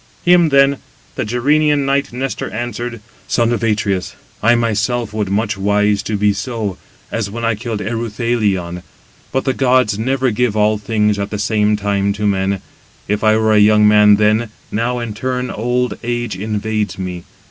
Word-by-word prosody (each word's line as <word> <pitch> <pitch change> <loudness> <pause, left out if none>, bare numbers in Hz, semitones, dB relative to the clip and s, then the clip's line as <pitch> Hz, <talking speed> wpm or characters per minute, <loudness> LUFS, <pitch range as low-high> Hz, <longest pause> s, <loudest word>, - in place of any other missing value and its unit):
Him 175 -2 +5
then 140 0 +4 0.4
the - - -2
Gerenian 145 +5 +2
knight 140 +1 0
Nestor 130 +2 -4
answered: 120 0 -5 0.3
"Son 120 0 +1
of 115 - -2
Atreus, 105 -4 -1 0.3
I 120 +2 +4
myself 115 0 -1
would 105 -3 -2
much 105 +1 -1
wish 105 +1 +2
to 105 - -3
be 105 0 +2
so, 110 -3 -4 0.3
as 110 -3 -2
when 115 +3 -4
I 115 - +2
killed 110 -1 -4
Eruthalion. 110 -6 -1 0.5
But 130 - -1
the 130 - +1
gods 125 -5 +2
never 130 +2 0
give 110 -1 0
all 105 0 +2
things 105 0 0
at 100 0 -2
the 105 - -4
same 105 0 +1
time 100 -1 0
to 105 +1 -3
men. 95 -1 0 0.4
If 105 +2 -1
I 110 0 +4
were 110 0 +2
a 105 - +5
young 105 0 +5
man 105 0 +6
then, 105 +2 +2 0.2
now 120 +3 -1
in 120 -3 -4
turn 125 +3 -3
old 125 +3 -1
age 120 -3 -3
invades 105 0 -2
me. 90 -2 -5
110 Hz, 170 wpm, -17 LUFS, 105-120 Hz, 0.5 s, man